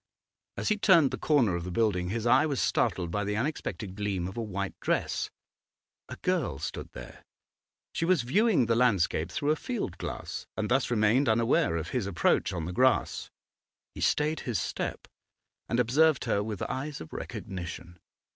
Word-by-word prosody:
As - - -1
he 210 -1 +1
turned 170 -9 +5
the - - -3
corner 125 - +3
of 85 - -3
the 90 - -5
building 90 -2 +1
his 110 +3 -2
eye 145 +6 +5
was 140 -4 -1
startled 85 -2 0
by 105 +3 -1
the 105 +1 -2
unexpected 115 -6 -3
gleam 100 -3 -2
of 95 - -7
a 115 - -2
white 100 -3 -3
dress. - - -1 0.8
A - - -6
girl - - 0
stood - - -6
there; - - -10 0.7
she - - -2
was 170 -6 +3
viewing 195 - +3
the 115 0 +2
landscape 95 -8 +2
through 145 +10 0
a - - +3
field 200 - -4
glass, - - -5
and 110 -1 -1
thus 130 +1 +2
remained 115 +3 +3
unaware 110 -6 +2
of 80 0 -4
his 120 -6 -1
approach 90 -4 +2
on 85 -3 -3
the 90 - -4
grass. 130 +5 +2 0.6
He - - -8
stayed 150 +1 +1
his 115 -7 -2
step - - -4 0.6
and 115 - +1
observed 140 +5 +3
her 105 -4 +1
with 105 -2 -4
eyes 140 +2 -4
of 80 - -10
recognition. 85 -1 -7
115 Hz, 175 wpm, -29 LUFS, 95-140 Hz, 0.8 s, turned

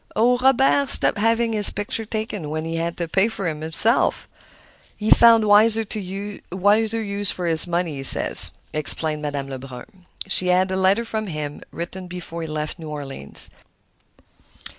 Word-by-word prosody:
"Oh, 245 +3 +1
Robert 270 +1 +1
stopped - - +4
having 230 +1 -1
his 210 -1 +7
pictures 210 +2 -5
taken 215 -7 -7
when 155 +1 -6
he 165 0 -6
had 170 +1 -5
to 170 - -5
pay 190 +6 0
for 200 -5 -6
them 155 -2 -6
himself! 165 +9 -2 0.7
He 215 0 -4
found 230 -2 +4
wiser 220 +2 +3
use 205 +1 -3
for 180 - -3
his 165 0 +5
money, 170 -3 -4
he - - -7
says," - - +8 0.2
explained 155 0 +1
Madame 145 -2 -6
Lebrun. 135 +7 -13 0.2
She 185 -1 +3
had 185 +1 0
a - - -3
letter 190 +5 0
from 220 -1 -6
him, 150 -4 -8
written 180 +2 -9
before 175 -1 -9
he 160 - -7
left 155 +1 -7
New 160 -2 -10
Orleans. 140 - -7
185 Hz, 160 wpm, -19 LUFS, 160-215 Hz, 0.7 s, says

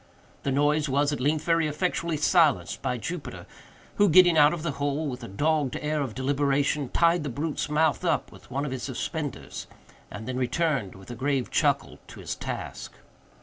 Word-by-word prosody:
The 140 - -1
noise 145 +2 +2
was, 145 +2 +2
at - - -3
length, 150 +4 +1
very 165 -2 +3
effectually 170 +1 -1
silenced 155 -1 +3
by 125 - -1
Jupiter, 155 +8 -6 0.5
who, 205 0 +5
getting 175 +1 +7
out 150 -1 +6
of 170 -3 -4
the 170 - -1
hole 145 +2 -2
with 125 -2 -5
a - - -6
dogged 145 +5 0
air 150 0 -1
of 130 -6 -4
deliberation, 140 +1 +1
tied 170 +3 +3
the 145 - -3
brute's 145 +4 -3
mouth 155 0 +2
up - - 0
with - - -16
one 140 +3 -2
of 145 - -4
his 130 -1 -4
suspenders, 145 +3 -5 0.4
and 105 +3 -8
then 130 0 -3
returned, 130 - 0
with 95 +4 -11
a - - -6
grave 135 0 -1
chuckle, - - +1
to - - -12
his - - -4
task. - - -6
145 Hz, 190 wpm, -26 LUFS, 130-155 Hz, 0.5 s, getting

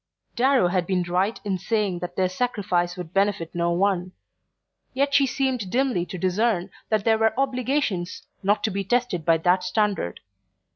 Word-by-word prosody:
Darrow 255 -6 +3
had 180 -1 0
been 185 -2 +1
right 185 +5 0
in 190 -2 -1
saying 205 -4 -1
that 175 0 -6
their 185 -1 +2
sacrifice 185 -4 -1
would 175 -1 -7
benefit 195 -4 0
no 170 0 0
one; 185 0 0 0.8
yet 280 +1 +1
she 280 -1 +5
seemed 255 -7 -1
dimly 245 -7 0
to 185 - -6
discern 185 +1 0 0.2
that 215 -2 +1
there 220 -1 +3
were 220 +2 +2
obligations 255 -9 -1 0.2
not 205 +2 +1
to 215 - +1
be 195 +1 -2
tested 235 -5 0
by 165 0 +4
that 180 +3 +2
standard. 195 - -1
195 Hz, 165 wpm, -24 LUFS, 180-235 Hz, 0.8 s, she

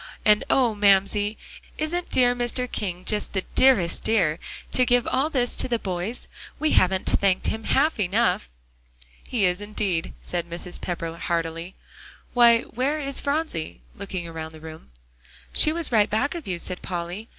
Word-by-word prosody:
And 210 0 +5
oh! 245 -4 +3
Mamsie, 205 +1 +2 0.4
isn't 340 +3 -3
dear 245 -1 +3
Mr. 245 +1 -1
King 180 -3 -4
just 210 -1 -1
the 190 -2 -2
dearest 225 -11 +3
dear, 180 -8 +2 0.3
to 255 - +3
give 245 -1 +2
all 270 +4 0
this 250 -5 +1
to - - +4
the 240 -2 0
boys? 190 +3 -4 0.3
We 310 0 0
haven't 185 0 +2
thanked 195 -2 +2
him 220 0 -3
half 285 -1 +2
enough." 200 - +1 0.8
"He 225 -6 +1
is 180 +2 0
indeed," 205 -5 -2
said 170 -1 -4
Mrs. 175 +1 -2
Pepper 165 -2 -4
heartily. 165 +1 -3 0.6
"Why, 235 -1 +6
where 265 +7 -2
is 275 -2 0
Phronsie?" 280 - -3
looking 185 -3 -5
around 160 -1 -7
the 160 - -12
room. 160 0 -11 0.6
"She 305 - +5
was 330 -2 +2
right 215 -2 +3
back 235 +7 0
of 340 - -7
you," 180 -2 -2
said 180 +1 -1
Polly. 180 +5 -5
210 Hz, 160 wpm, -24 LUFS, 175-245 Hz, 0.8 s, Why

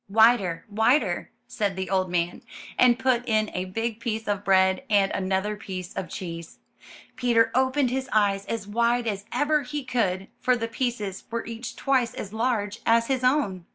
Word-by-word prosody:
'Wider, 210 -5 +4
wider, 225 +7 +1 0.2
said 205 -4 -2
the 190 0 -3
old 185 -1 +1
man, 175 0 -1 0.3
and 245 -1 +5
put 250 -2 +1
in 215 -1 +1
a 180 0 -2
big 225 +4 -3
piece 225 -1 -3
of 205 -1 -1
bread 190 0 +3
and 200 -2 +3
another 190 +2 -1
piece 185 -4 -7
of 185 - -5
cheese. 170 -2 -7 0.6
Peter 235 -2 +3
opened 260 0 +2
his 260 0 -2
eyes 200 -2 +2
as 225 -3 -4
wide 235 +3 +1
as 205 -2 -3
ever 300 +1 +2
he 285 +2 -5
could, 195 -7 -1
for 255 - +2
the 230 -1 -2
pieces 230 -5 -3
were 230 0 -3
each 230 +1 -6
twice 255 -4 +1
as 200 0 -6
large 220 -2 -1
as 230 +1 +3
his 260 -1 0
own. 235 - +1
220 Hz, 175 wpm, -25 LUFS, 195-245 Hz, 0.6 s, and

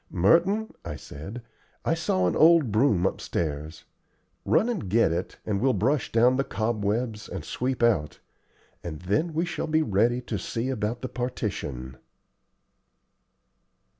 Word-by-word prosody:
"Merton," 180 - +3
I 75 - -5
said, 95 - -9 0.4
"I - - +2
saw 95 -1 0
an - - 0
old 160 -6 +5
broom 105 -5 +3
upstairs. 75 -4 -3 0.6
Run 225 - +3
and 205 - -3
get 110 -4 +3
it, 85 +3 -3
and 100 -2 -1
we'll 130 +1 +3
brush 125 +7 0
down 120 +3 +4
the 135 - +2
cobwebs 110 -1 -2
and 90 -5 -6
sweep 125 -1 -2
out, 100 -11 +2 0.6
and 80 -2 -6
then 105 - 0
we 165 +3 0
shall 175 - -3
be 155 0 +2
ready 115 +1 +2
to 125 - -4
see 120 +2 -3
about 120 -1 -2
the - - -1
partition." 85 - -4
115 Hz, 140 wpm, -26 LUFS, 95-130 Hz, 0.6 s, old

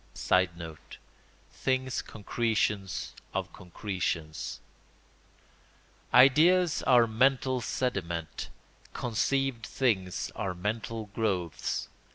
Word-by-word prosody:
[Sidenote: 85 -4 -1 0.5
Things 130 -1 -1
concretions 105 -3 -1 0.2
of - - -2
concretions.] 90 -4 -4 1.5
Ideas 160 +7 +6
are 125 -3 +7
mental 130 +2 +2
sediment; 90 -10 -3 0.4
conceived 125 +1 0
things 100 -7 0
are 90 -2 -2
mental 110 +2 -3
growths. 95 -8 -1
110 Hz, 70 wpm, -29 LUFS, 90-130 Hz, 1.5 s, are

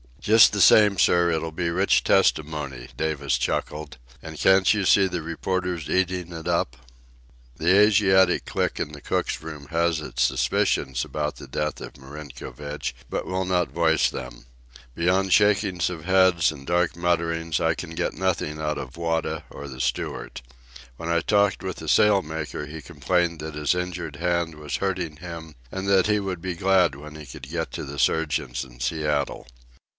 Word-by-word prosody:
"Just 110 0 +6
the 100 - +1
same, 105 +1 +6
sir, 85 -1 +4
it'll 80 0 -2
be 85 +2 -2
rich - - +2
testimony," 75 -5 +1
Davis 70 -4 -1
chuckled. 75 +2 -3 0.2
"An' 80 -1 -9
can't 95 +3 +4
you 105 -3 +1
see 95 +1 +5
the 90 -2 -3
reporters 90 0 -3
eatin' 90 -1 0
it 80 -1 -7
up?" - - 0 0.8
The 85 +4 +3
Asiatic 95 -3 +4
clique - - -2
in 75 - -3
the 75 - -10
cook's - - -2
room 75 -3 -8
has 85 -1 +1
its 75 - -5
suspicions 65 -2 +1
about 75 0 -3
the - - -11
death 75 0 -3
of - - -9
Marinkovich, 75 +1 -7
but - - -3
will 95 0 -1
not 90 -2 +1
voice 80 -1 +2
them. 60 -1 -8 0.5
Beyond 90 +2 +2
shakings 100 -4 +3
of 85 -2 -7
heads 95 -3 +4
and 70 -3 -11
dark 85 0 +1
mutterings, 85 -1 0
I 80 0 +2
can 80 0 -7
get 80 - -2
nothing 85 -4 -2
out 75 -1 -2
of 70 +2 -7
Wada 80 -1 -2
or 70 - -9
the 65 -2 -7
steward. - - -3 0.6
When 85 - -6
I 85 0 +2
talked 100 0 +2
with 95 -1 -4
the - - -8
sail 105 -2 +5
maker, 80 -2 -5
he 80 +1 -8
complained 85 +2 -1
that 80 0 -6
his 75 0 +1
injured 90 -4 -4
hand 85 -1 -1
was 75 -2 -4
hurting 90 -5 -2
him 80 -2 -9 0.2
and 95 +1 -4
that 95 -1 +4
he 105 -1 +2
would 95 -4 -4
be 90 0 -3
glad 90 -3 +3
when 75 +2 -11
he 75 -1 -9
could 65 -1 -10
get 80 0 -3
to - - -4
the 70 +1 -7
surgeons 75 -6 0
in - - -15
Seattle. 75 +1 -1
85 Hz, 175 wpm, -24 LUFS, 75-90 Hz, 0.8 s, Just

